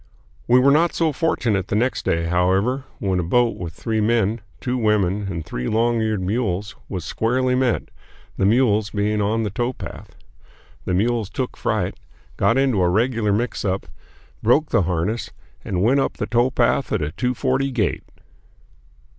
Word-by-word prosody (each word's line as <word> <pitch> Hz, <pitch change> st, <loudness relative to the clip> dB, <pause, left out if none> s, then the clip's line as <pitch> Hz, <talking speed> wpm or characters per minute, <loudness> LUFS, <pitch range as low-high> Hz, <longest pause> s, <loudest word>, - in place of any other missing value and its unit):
We 125 Hz, -, +6 dB
were 135 Hz, +2 st, +5 dB
not 165 Hz, +4 st, +3 dB
so 165 Hz, -2 st, +2 dB
fortunate 115 Hz, -, 0 dB
the -, -, -1 dB
next 125 Hz, +5 st, 0 dB
day, 85 Hz, 0 st, +1 dB
however, 95 Hz, +10 st, +1 dB
when 95 Hz, -2 st, -1 dB
a -, -, 0 dB
boat 120 Hz, +7 st, +2 dB
with 85 Hz, -3 st, -6 dB
three 110 Hz, +4 st, -2 dB
men, 110 Hz, 0 st, +1 dB, 0.2 s
two 125 Hz, 0 st, -2 dB
women, 105 Hz, -4 st, +1 dB
and 85 Hz, -4 st, -4 dB
three 60 Hz, -3 st, -4 dB
long 115 Hz, +1 st, +1 dB
eared 110 Hz, -3 st, -1 dB
mules 100 Hz, -1 st, -2 dB
was 90 Hz, -4 st, -4 dB
squarely 125 Hz, +7 st, 0 dB
met, 125 Hz, -2 st, 0 dB, 0.5 s
the 95 Hz, -, +2 dB
mules 110 Hz, -2 st, +3 dB
being 105 Hz, +1 st, 0 dB
on 110 Hz, +2 st, +1 dB
the 105 Hz, -, -2 dB
towpath. 120 Hz, +5 st, -5 dB, 0.7 s
The 90 Hz, -, 0 dB
mules 110 Hz, +1 st, 0 dB
took 130 Hz, +2 st, -4 dB
fright, -, -, -1 dB, 0.4 s
got 115 Hz, -, +2 dB
into 130 Hz, -7 st, +2 dB
a 90 Hz, -, +3 dB
regular 110 Hz, +2 st, +1 dB
mixup, 100 Hz, -3 st, -1 dB, 0.6 s
broke 145 Hz, +7 st, +3 dB
the -, -, +3 dB
harness, 90 Hz, +6 st, -1 dB, 0.3 s
and 90 Hz, -1 st, -1 dB
went 130 Hz, +6 st, +4 dB
up -, -, 0 dB
the -, -, -2 dB
towpath 120 Hz, +2 st, +1 dB
at 105 Hz, -7 st, 0 dB
a 75 Hz, -, -3 dB
two 125 Hz, +7 st, -1 dB
forty 135 Hz, +3 st, 0 dB
gait. 115 Hz, -8 st, -1 dB
110 Hz, 165 wpm, -22 LUFS, 95-125 Hz, 0.7 s, We